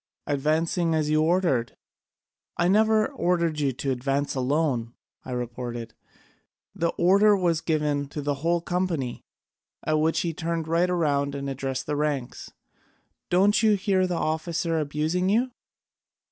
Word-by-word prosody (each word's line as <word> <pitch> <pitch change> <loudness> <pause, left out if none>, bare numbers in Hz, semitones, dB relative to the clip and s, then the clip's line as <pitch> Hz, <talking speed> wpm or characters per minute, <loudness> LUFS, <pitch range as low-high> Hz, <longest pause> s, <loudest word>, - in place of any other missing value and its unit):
'Advancing 160 +4 0
as 155 -1 0
you 155 0 +3
ordered.' 160 -8 +1 0.8
'I 175 +1 +2
never 215 +2 +4
ordered 170 - 0
you 140 -2 +1
to 135 +2 -2
advance 135 +3 -1
alone,' 130 -3 0 0.3
I - - -10
retorted, 120 -1 -5 0.8
'the 170 - 0
order 200 +4 +5
was 170 -4 +1
given 150 -3 0
to 145 +1 -6
the 145 0 0
whole 170 +1 +1
company.' 170 -8 -2 0.6
At 155 0 +2
which 160 +1 +1
he 170 -2 -2
turned 165 -1 -3
right 170 +2 +2
round 140 -5 0
and 140 0 -4
addressed 135 -1 -3
the 150 - -2
ranks: 145 -4 -2 0.8
'Don't 200 +4 +4
you 215 -2 +4
hear 190 -2 +1
the 180 - -2
officer 160 +1 -1
abusing 155 +5 -1
you? 240 +5 +2
160 Hz, 140 wpm, -25 LUFS, 140-180 Hz, 0.8 s, order